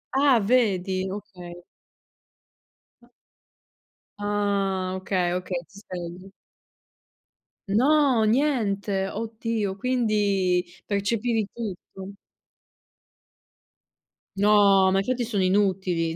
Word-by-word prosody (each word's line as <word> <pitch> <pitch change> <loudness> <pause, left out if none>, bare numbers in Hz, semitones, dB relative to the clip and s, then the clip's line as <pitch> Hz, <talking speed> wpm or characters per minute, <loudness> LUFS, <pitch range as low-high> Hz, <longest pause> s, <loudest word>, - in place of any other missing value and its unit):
Ah, 270 -3 +4
vedi? 195 -5 +1
Okay. 180 -3 -9 2.6
Ah, 200 -2 -1
okay, 185 -2 -1
okay, 185 0 -4
ti 200 - -16
svegli. 180 -1 -8 1.4
No! 260 +2 +3
Niente? 215 -6 0
Oddio, 220 -2 -3
quindi 205 -6 +1 0.2
percepivi 215 +2 0
tutto. 195 -3 -8 2.3
No, 200 -2 +5
ma 195 - +2
i - - +2
chiodi 250 +2 -1
sono 215 -4 -1
inutili. 185 -4 +1
200 Hz, 75 wpm, -25 LUFS, 190-225 Hz, 2.6 s, No